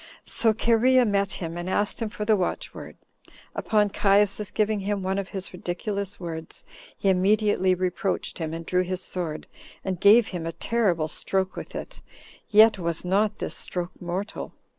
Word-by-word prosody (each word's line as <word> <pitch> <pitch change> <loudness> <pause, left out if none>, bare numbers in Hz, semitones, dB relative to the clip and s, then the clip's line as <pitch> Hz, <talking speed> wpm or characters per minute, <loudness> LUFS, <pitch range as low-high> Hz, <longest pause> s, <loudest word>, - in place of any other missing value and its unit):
So 225 - +2
Cherea 240 +3 +4
met 200 -2 +1
him, 165 -1 -5
and 175 +1 -4
asked 205 +2 0
him 225 - -1
for 210 0 -5
the 215 0 +4
watchword; 185 -3 -4 0.6
upon 210 -2 +1
Caius's 205 +1 +2
giving 215 0 0
him 200 0 -2
one 190 +1 0
of 195 - -4
his 190 -2 -6
ridiculous 195 +3 -3
words, 165 -2 -6 0.3
he - - -2
immediately 190 0 +3
reproached 185 +1 -2
him, 160 -1 -3
and 165 0 -6
drew 180 +2 +2
his 185 0 -3
sword, 170 -5 -4 0.4
and 185 -3 -2
gave 215 +2 +6
him 170 -3 -4
a 165 - -4
terrible 190 -9 0
stroke 190 +4 -2
with - - -8
it, - - -7 0.5
yet 215 -1 +6
was 170 -1 -2
not 205 +3 +1
this - - -5
stroke 180 0 -1
mortal. 180 +4 -4
195 Hz, 165 wpm, -25 LUFS, 180-210 Hz, 0.6 s, gave